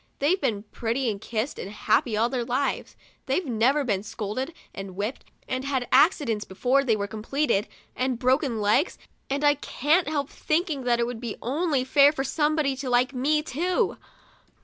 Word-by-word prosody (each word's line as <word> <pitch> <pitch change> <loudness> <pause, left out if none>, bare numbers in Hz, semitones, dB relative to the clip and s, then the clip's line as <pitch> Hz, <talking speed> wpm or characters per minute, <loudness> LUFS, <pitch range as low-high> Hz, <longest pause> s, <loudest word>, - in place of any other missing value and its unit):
They've 325 +7 +1
been 220 -7 -1
petted 240 +3 -1
and 200 -1 -7
kissed 225 +4 -3
and 190 - -5
happy 210 +2 +1
all 225 +2 +3
their 245 -1 -2
lives; 255 +4 -2 0.3
they've 300 +7 0
never 255 +4 +2
been 205 -7 0
scolded 215 +7 -4 0.2
and 195 -1 -7
whipped, 210 +6 -4 0.2
and 255 0 -2
had 265 -3 -1
accidents 270 - +3
before 250 +8 +1
they 235 -5 +2
were 200 -1 -2
complete, 220 +2 -1 0.3
and 255 -1 0
broken 255 -1 +1
legs! 215 - +2 0.3
and 280 +2 -1
I 290 0 +6
can't 295 +4 +1
help 285 -3 -2
thinking 310 -4 -1
that 240 -1 +2
it 235 - +2
would 240 -1 -5
be 235 -4 -5
only 285 +1 0
fair 280 +2 +5
for 270 -3 -3
somebody 295 0 +1
to 265 -1 -4
like 250 +2 +2
me, 300 +4 +1
too. 345 +6 0
260 Hz, 175 wpm, -26 LUFS, 225-290 Hz, 0.3 s, I